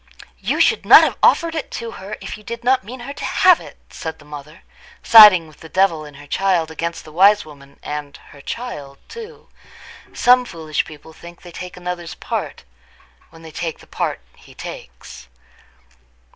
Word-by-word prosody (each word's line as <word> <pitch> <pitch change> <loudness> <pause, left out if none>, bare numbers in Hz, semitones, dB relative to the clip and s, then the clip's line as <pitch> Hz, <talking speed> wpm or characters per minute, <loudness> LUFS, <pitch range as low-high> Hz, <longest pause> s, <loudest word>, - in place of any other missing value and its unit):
"You - - -2
should 450 - +3
not - - +9
have - - 0
offered 335 -1 +3
it 315 -3 -4
to 230 -1 -6
her 205 +1 -8
if - - -6
you 215 - -15
did 235 +2 -7
not 255 -2 +2
mean 240 +5 -10
her 275 +3 -7
to 295 - -9
have 365 -2 +4
it," - - -13
said 160 -2 -6
the 150 - -18
mother, 150 +2 -11 0.4
siding 210 -7 +9
with 155 - -19
the 160 - -12
devil 175 -5 +1
in 145 -1 -13
her 145 +1 -13
child 175 0 0
against 170 +1 -5
the 155 - -12
wise 200 +5 +4
woman 140 -2 -16
and 150 -1 -6
her 140 - -14
child 145 - -7
too. 460 0 -11 0.6
Some 250 +1 +4
foolish 160 -9 -4
people 155 +1 -13
think 170 +2 -14
they 175 - -11
take 180 +1 -9
another's 175 -2 -6
part - - -5 0.7
when 165 0 -17
they 160 - -11
take 165 0 -5
the - - -17
part - - -3 0.2
he - - -18
takes. 60 0 -10
170 Hz, 185 wpm, -19 LUFS, 155-225 Hz, 0.7 s, not